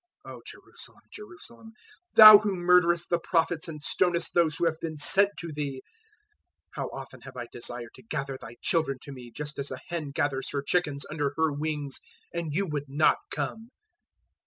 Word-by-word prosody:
023:037 - - -8
"O - - -11
Jerusalem, - - -11
Jerusalem! 235 - -11 0.4
thou 215 -2 +12
who 205 -2 -2
murderest 175 -1 +3
the 175 - +2
Prophets 165 -1 0
and 155 -2 -7
stonest 175 +2 +1
those 165 -3 +2
who 170 - 0
have 160 -1 0
been 160 -2 -5
sent 195 +7 +5
to 170 -1 -6
thee! 140 -3 -5 0.9
how - - -4
often - - -9
have - - -12
I 120 - -5
desired 120 -1 -5
to - - -15
gather 135 -3 -3
thy 115 - -10
children 160 -5 +1
to 140 - -9
me, 125 -3 -10
just 150 +4 -6
as 140 - -3
a 130 - -5
hen 165 -4 -4
gathers 140 -2 -2
her 140 -1 -2
chickens 145 -4 0
under 145 -3 -2
her 160 -1 +2
wings, 145 -2 -3 0.3
and 170 -2 -3
you 190 +7 0
would 145 -4 -4
not 150 +3 +3
come! 225 +1 -5
155 Hz, 185 wpm, -27 LUFS, 140-175 Hz, 0.9 s, thou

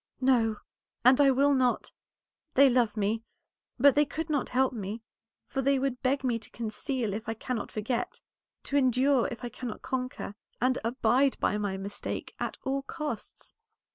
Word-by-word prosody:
"No, 245 -4 +3 0.5
and 255 +3 +7
I 280 - +6
will 280 +2 +4
not. 255 -2 +1 0.6
They 275 0 +7
love 235 -3 +2
me, 215 +2 0 0.6
but 275 +2 +6
they 295 - +5
could 315 +2 -4
not 285 -4 0
help 260 +1 +2
me; 215 0 -5 0.4
for 270 - -2
they 275 +1 +3
would 265 -1 -1
beg 270 +2 +1
me 240 -3 +1
to - - -10
conceal 230 0 -3
if 220 +2 -5
I 225 - -2
cannot 230 0 -4
forget, 225 +3 -2 0.4
to 285 - 0
endure 260 0 +3
if 240 -3 -8
I 240 - -3
cannot 240 -2 -7
conquer, 255 -5 -3 0.3
and 255 +1 +2
abide 250 +3 +2
by 210 - +1
my 200 -2 -2
mistake 200 +1 -5
at - - -3
all 275 +1 -1
costs. 285 -4 -6
255 Hz, 170 wpm, -29 LUFS, 225-270 Hz, 0.6 s, and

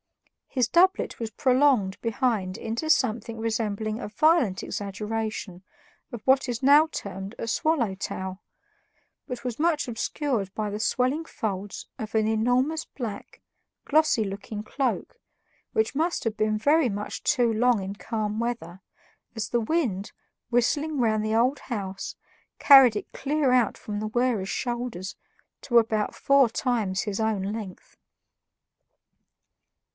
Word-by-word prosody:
His 255 -4 +1
doublet 375 - +3
was 225 -2 -3
prolonged 250 -4 +2
behind 225 -5 -1
into 230 +8 -3
something 230 -5 +1
resembling 220 0 -2
a - - -5
violent 280 - +2
exaggeration 210 -2 -4 0.5
of 240 - -6
what 265 0 +3
is 240 -1 -3
now 295 +4 +6
termed 195 +2 -6
a - - -5
"swallowtail," 200 - -1 0.9
but 250 0 -6
was 245 0 -3
much 320 -3 +1
obscured 235 -3 -2
by 215 -1 -2
the 210 - -4
swelling 255 +7 +1
folds 205 -9 -5
of 220 0 -6
an 220 -1 +3
enormous 245 +8 +1
black, 230 -6 -7 0.4
glossy 300 -7 +3
looking 200 +2 -6
cloak, 275 - -2 0.5
which 440 -9 0
must 330 +4 0
have 225 -1 -1
been 215 0 +1
very 285 +4 +3
much 205 0 -5
too 245 -5 +2
long 240 -1 +3
in 190 +1 -4
calm 215 0 -3
weather, 225 -7 -4 0.5
as 220 -3 -3
the 240 - +1
wind, 225 - -1 0.4
whistling 290 +5 +1
round 215 -3 +2
the 215 +1 0
old 255 +5 +2
house, 195 -6 -5 0.4
carried 270 -5 +8
it 210 - -5
clear 290 -1 0
out 245 -4 +3
from 205 -1 -5
the 215 - -3
wearer's 225 -4 0
shoulders 240 -7 -3 0.5
to 240 -3 +2
about 220 -2 +2
four 275 -3 +4
times 220 -6 -1
his 205 -1 -3
own 220 -3 0
length. 210 -5 -8
225 Hz, 135 wpm, -26 LUFS, 210-260 Hz, 0.9 s, carried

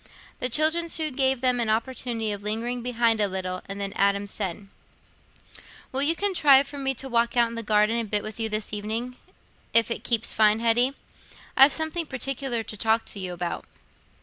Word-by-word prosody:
The 250 - -1
children 315 +6 +2
soon 310 -3 -1
gave 265 -1 0
them 250 -1 +2
an 230 -2 -1
opportunity 230 -1 -2
of 205 -1 -5
lingering 230 +4 -3
behind 235 -2 +1
a 205 - +3
little, 185 -1 -4
and 200 0 -6
then 200 -1 -4
Adam 200 0 +1
said: 200 -1 -5 1.2
"Will 265 - 0
you 315 +4 +2
contrive 300 -9 +4
for 285 0 -8
me 270 -1 -1
to 270 - -2
walk 235 -1 0
out 235 -1 +4
in - - -9
the 230 - -4
garden 215 +1 +2
a - - -1
bit 210 -1 -1
with 215 +1 -7
you 225 -1 0
this 215 0 -2
evening, 220 +4 -3 0.6
if 230 0 +5
it - - -3
keeps 230 -2 +1
fine, 215 0 +3
Hetty? 240 +4 +2 0.6
I've 270 +2 +8
something 320 +2 -1
partic'lar 260 -2 -2
to 215 - -8
talk 225 +2 +1
to 200 - -3
you 185 -2 -4
about." 175 0 -4
230 Hz, 195 wpm, -25 LUFS, 210-265 Hz, 1.2 s, I've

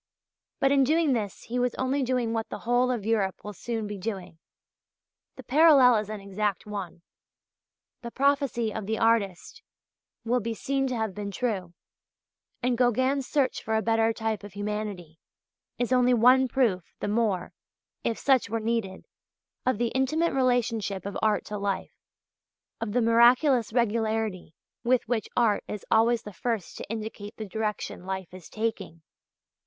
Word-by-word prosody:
But 270 - +3
in 275 -1 +5
doing 310 +1 +3
this 210 -5 -3
he 245 +2 -3
was 250 0 0
only 260 +2 0
doing 250 -3 0
what 225 -1 -2
the - - -5
whole 245 +1 +3
of 235 -5 -2
Europe 210 -4 0
will 210 - -6
soon 225 +2 -4
be 205 -1 -6
doing. 190 -5 -5 1.0
The - - -10
parallel 275 -4 +6
is 210 -1 -3
an 215 -1 -5
exact 200 -1 -2
one. 195 -5 -6 1.0
The 235 - -6
prophecy 270 -4 +1
of 215 -3 -5
the 220 0 -1
artist 225 - 0 0.6
will 245 +2 +2
be 230 0 -3
seen 270 +3 -1
to 255 - -2
have 220 -4 -2
been 205 0 -5
true. 200 -6 -3 0.9
And 250 -1 +1
Gauguin's 260 +2 +2
search 280 -4 0
for 220 - -2
a 220 - +1
better 225 0 +2
type 220 -2 -3
of 205 -2 -10
humanity 205 -5 -5 0.6
is 245 0 -1
only 250 0 +4
one 255 +3 +5
proof 230 -9 +1 0.2
the - - -3
more, 205 -4 0 0.5
if 230 - -1
such 265 -6 +2
were 225 +1 -1
needed, 220 -4 -2 0.6
of 255 -4 +2
the 240 +1 0
intimate 305 +7 +1
relationship 235 -7 0
of 200 - -5
art 215 -1 +1
to 210 -1 -5
life, 200 -1 -2 0.9
and 230 - -3
of - - -5
the 245 - +3
miraculous 240 +1 +5
regularity 220 -6 -1 0.3
with 250 0 +2
which 225 -1 -1
art 220 -4 +3
is 210 - -6
always 230 +1 +3
the 210 - -9
first 225 -3 -3
to - - -8
indicate 215 -1 -6
the 220 - -5
direction 210 -2 -4
life 190 -1 -5
is 185 -3 -11
taking. 215 -7 -4
225 Hz, 165 wpm, -27 LUFS, 205-250 Hz, 1.0 s, parallel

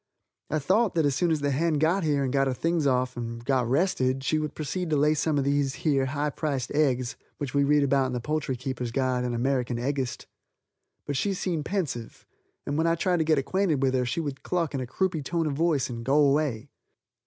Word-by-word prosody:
I 155 - 0
thought 190 +8 +2
that 160 -2 +3
as 140 - +2
soon 170 +6 +1
as 155 -2 +1
the 145 0 +1
hen 160 +4 +1
got 165 +6 +2
here 145 -3 +1
and 130 -1 -2
got 135 -1 +3
her 130 - -1
things 165 0 0
off 125 -1 +1
and 115 0 -6
got 130 -3 +1
rested 135 -4 +1
she 155 +3 +1
would 150 -1 -4
proceed 175 +3 -3
to 155 - +2
lay 150 +2 +4
some 155 0 0
of 140 - +2
these 140 -1 +1
here 135 -4 +2
high 145 +2 -1
priced 140 -5 -2
eggs 130 -4 +1 0.2
which 140 -4 -4
we 140 0 +3
read 145 +1 +3
of 140 -1 +1
in - - -4
the 125 - -1
Poultry 150 0 -2
Keepers' 125 -1 -4
Guide 130 0 0
and 120 -1 -2
American 125 -1 0
Eggist. 130 +1 -2 0.8
But 145 - -2
she 200 +5 0
seemed 175 -5 -2
pensive, 155 - -4 0.4
and 145 +2 -1
when 165 - +2
I 165 - +3
tried 180 +2 +1
to 160 - +2
get 155 -1 +2
acquainted 155 0 +1
with 130 -1 +2
her 130 -1 +2
she 165 - -1
would 140 -3 -5
cluck 170 -4 -1
in 135 - -1
a 130 - -4
croupy 185 +3 -1
tone 165 +4 -1
of 150 - -1
voice 150 -3 +1
and 115 -2 -6
go 135 +4 +1
away. 140 -4 +2
140 Hz, 235 wpm, -27 LUFS, 130-160 Hz, 0.8 s, lay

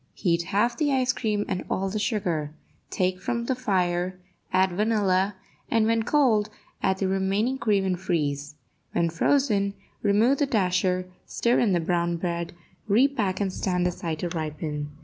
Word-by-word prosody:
Heat 170 -2 +1
half 235 +6 +1
the 265 -4 +1
cream 210 -3 -1
and 185 -2 -2
all 195 - 0
the 205 +3 -2
sugar; 175 -9 -1 0.3
take 185 0 -1
from 235 +2 -2
the 260 - +1
fire, 185 -6 0 0.3
add 185 0 +3
vanilla, 200 -1 +1 0.3
and, 225 -1 +3
when 225 0 +2
cold, 225 -5 +2 0.3
add 190 0 +1
the 190 - 0
remaining 195 +7 0
cream, 205 -3 +2
and 185 -2 -1
freeze. 150 -5 -2 0.4
When 170 -1 +1
frozen, 200 - +1 0.3
remove 220 +7 +3
the 290 - +2
dasher, 185 -4 +1 0.2
stir 235 +1 +1
in 210 -5 +3
the 175 - +3
brown 170 0 0
bread, 170 -1 -3 0.3
repack 220 -3 +2
and 195 -2 -1
stand 180 -2 0
aside 170 -2 -2
to 175 - -1
ripen. 155 -2 -4
190 Hz, 155 wpm, -26 LUFS, 175-220 Hz, 0.4 s, add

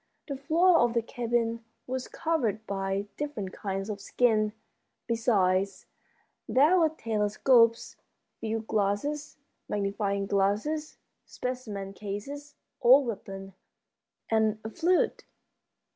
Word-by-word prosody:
The 280 - -3
floor 330 +6 +4
of 240 0 +2
the 235 - +2
cabin 230 -1 -1 0.2
was 255 0 -4
covered 250 - -1
by 195 0 -2
different 240 -11 -4
kinds 195 -1 -4
of 205 -2 -5
skins. 215 -1 +2 0.5
Besides, 195 -5 +1 0.6
there 305 +8 +5
were 320 -2 +4
telescopes, 230 -2 +2 0.4
field 225 0 -3
glasses, 220 +9 -1 0.3
magnifying 200 -1 -1
glasses, 210 +11 0 0.3
specimen 215 -6 -5
cases, 275 +9 -6 0.3
old 260 +3 +7
weapons, 195 -3 -6 0.8
and 220 -1 +2
a 220 - -5
flute. 350 +7 +1
225 Hz, 100 wpm, -28 LUFS, 200-270 Hz, 0.8 s, old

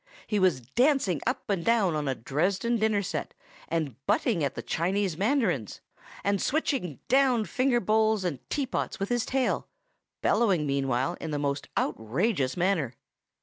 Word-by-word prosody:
He 210 - 0
was 185 -9 +3
dancing 210 - +2
up 255 - -1
and 195 -5 0
down 210 -7 +3
on 150 -1 -2
a 135 - 0
Dresden 185 - 0
dinner 215 -2 +1
set, - - -4 0.3
and 145 -6 -3
butting 165 - +2
at 140 - -1
the - - -5
Chinese 185 +1 0
mandarins, 195 - 0 0.4
and 200 -1 +1
switching 265 - -1
down 255 -4 +3
finger 250 +6 +1
bowls 215 0 +2
and 165 -8 -2
teapots 275 -3 -2
with 195 - -2
his 240 -1 0
tail, 265 -1 0 0.6
bellowing 190 -10 +3
meanwhile 135 +2 0
in 160 - -4
the 150 - -1
most 140 -1 -2
outrageous 130 - 0
manner. 170 -9 +1
185 Hz, 150 wpm, -28 LUFS, 145-230 Hz, 0.6 s, was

